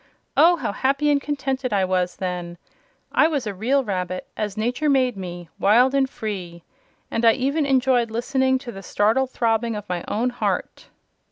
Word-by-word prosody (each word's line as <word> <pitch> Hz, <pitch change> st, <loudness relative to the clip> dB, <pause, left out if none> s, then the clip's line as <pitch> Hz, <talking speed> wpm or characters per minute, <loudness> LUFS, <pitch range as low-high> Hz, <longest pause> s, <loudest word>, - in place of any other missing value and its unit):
Oh, 345 Hz, +2 st, +6 dB
how 260 Hz, -10 st, -3 dB
happy 275 Hz, +6 st, +1 dB
and 285 Hz, -1 st, +2 dB
contented 270 Hz, -3 st, -2 dB
I 195 Hz, -2 st, +2 dB
was 180 Hz, -1 st, 0 dB
then! 180 Hz, -2 st, -4 dB, 0.5 s
I 310 Hz, -, +4 dB
was 290 Hz, -6 st, -2 dB
a 210 Hz, -, -3 dB
real 255 Hz, +8 st, +1 dB
rabbit, 185 Hz, -4 st, -3 dB
as 210 Hz, -2 st, -3 dB
nature 250 Hz, +7 st, 0 dB
made 260 Hz, -4 st, +2 dB
me 175 Hz, -2 st, -7 dB
wild 245 Hz, +6 st, +4 dB
and 270 Hz, -1 st, +2 dB
free! 180 Hz, -8 st, -6 dB, 0.5 s
and 230 Hz, -, -1 dB
I 225 Hz, -1 st, +7 dB
even 280 Hz, +4 st, 0 dB
enjoyed 255 Hz, -3 st, +2 dB
listening 260 Hz, +3 st, +1 dB
to 240 Hz, -, -5 dB
the 195 Hz, -, -9 dB
startled 220 Hz, +7 st, +1 dB
throbbing 230 Hz, -2 st, 0 dB
of 210 Hz, 0 st, -7 dB
my 180 Hz, -1 st, -3 dB
own 240 Hz, +4 st, 0 dB
heart!" 245 Hz, -, -3 dB
235 Hz, 175 wpm, -23 LUFS, 195-265 Hz, 0.5 s, I